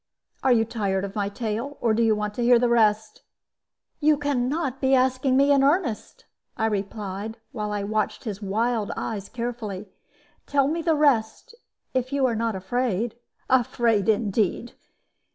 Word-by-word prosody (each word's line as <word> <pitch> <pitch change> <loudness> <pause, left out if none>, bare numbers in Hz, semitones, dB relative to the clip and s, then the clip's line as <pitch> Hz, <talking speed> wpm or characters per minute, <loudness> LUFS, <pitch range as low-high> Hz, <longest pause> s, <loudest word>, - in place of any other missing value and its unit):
Are 265 - +3
you 225 -2 +4
tired 200 -4 -1
of 195 - -7
my 200 -1 -1
tale? 230 +6 -4
Or 230 -2 +2
do 225 - +1
you 225 -1 +3
want 210 0 -3
to 240 - -4
hear 240 0 +6
the 245 +1 +2
rest?" 215 -2 +2 0.8
"You 305 -1 +4
can 280 -4 0
not 275 -3 -2
be 265 0 +4
asking 260 +1 +2
me 280 +1 +4
in 275 -1 +4
earnest," 280 - 0 0.3
I 220 - 0
replied, 205 0 -3
while 210 -5 -4
I 205 -1 -2
watched 215 +1 -2
his 210 -3 -5
wild 220 +2 -1
eyes 200 -3 -4
carefully. 225 -5 -5 0.6
"Tell 280 -1 +2
me 325 +3 -1
the 325 -1 +2
rest, 285 - +1 0.4
if 255 0 -1
you 280 -1 +2
are 240 -3 +1
not 225 -1 -1
afraid." 225 +2 -1 0.3
"Afraid, 235 -4 +2
indeed! 215 +1 0
230 Hz, 165 wpm, -25 LUFS, 210-260 Hz, 0.8 s, hear